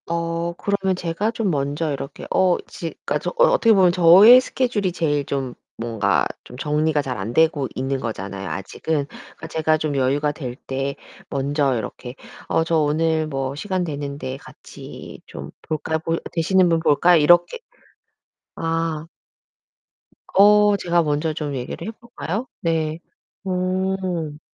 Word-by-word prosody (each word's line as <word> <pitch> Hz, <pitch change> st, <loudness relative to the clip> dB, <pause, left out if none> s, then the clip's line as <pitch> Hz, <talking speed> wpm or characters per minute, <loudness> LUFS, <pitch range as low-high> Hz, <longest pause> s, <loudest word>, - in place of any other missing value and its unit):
어, 170 Hz, 0 st, -2 dB
그러면 195 Hz, +1 st, -1 dB
제가 180 Hz, +5 st, -2 dB
좀 220 Hz, -5 st, -1 dB
먼저 145 Hz, +2 st, -1 dB
이렇게 140 Hz, 0 st, -7 dB
어 185 Hz, -2 st, +3 dB
지 165 Hz, -, -6 dB, 0.2 s
그러니까 -, -, 0 dB
저 -, -, -3 dB
어 -, -, +6 dB
어떻게 230 Hz, -1 st, +4 dB
보면 185 Hz, -3 st, +5 dB
저의 185 Hz, +8 st, +8 dB
스케줄이 235 Hz, -8 st, -1 dB
제일 145 Hz, -4 st, 0 dB
좀 135 Hz, -3 st, -3 dB, 0.2 s
뭔가 110 Hz, -4 st, 0 dB, 0.2 s
좀 125 Hz, -, -12 dB
정리가 150 Hz, +1 st, +1 dB
잘 130 Hz, -4 st, -4 dB
안 105 Hz, +5 st, -4 dB
되고 155 Hz, -2 st, +2 dB
있는 135 Hz, +1 st, -2 dB
거잖아요 100 Hz, -4 st, -5 dB
아직은. 140 Hz, +9 st, -3 dB, 0.4 s
제가 155 Hz, 0 st, +1 dB
좀 155 Hz, -2 st, -2 dB
여유가 140 Hz, +3 st, +1 dB
될 130 Hz, -5 st, -6 dB
때 135 Hz, +1 st, -4 dB, 0.3 s
먼저 140 Hz, 0 st, 0 dB
이렇게 125 Hz, +2 st, -6 dB, 0.3 s
"어, 165 Hz, -, +1 dB
저 165 Hz, 0 st, +1 dB
오늘 155 Hz, +1 st, +1 dB
뭐 135 Hz, -2 st, -3 dB
시간 185 Hz, +4 st, -2 dB
되는데 140 Hz, -4 st, -5 dB
같이 -, -, -12 dB
좀 -, -, -9 dB
볼까요? 160 Hz, +1 st, -2 dB
볼 165 Hz, +1 st, -2 dB
되시는 180 Hz, +2 st, +3 dB
분 165 Hz, -1 st, +2 dB
볼까?" 165 Hz, +3 st, +4 dB
이렇게 175 Hz, -, +4 dB, 1.0 s
아. 165 Hz, -1 st, -2 dB, 1.3 s
어, 205 Hz, +1 st, +6 dB
제가 175 Hz, -2 st, +1 dB
먼저 150 Hz, +1 st, -1 dB
좀 150 Hz, -2 st, -4 dB
얘기를 125 Hz, +9 st, -5 dB
해 -, -, -3 dB
볼까요? 230 Hz, -1 st, -6 dB
네. 160 Hz, -1 st, -1 dB, 0.5 s
음. 185 Hz, -4 st, -2 dB
160 Hz, 265 characters per minute, -22 LUFS, 140-180 Hz, 1.3 s, 저의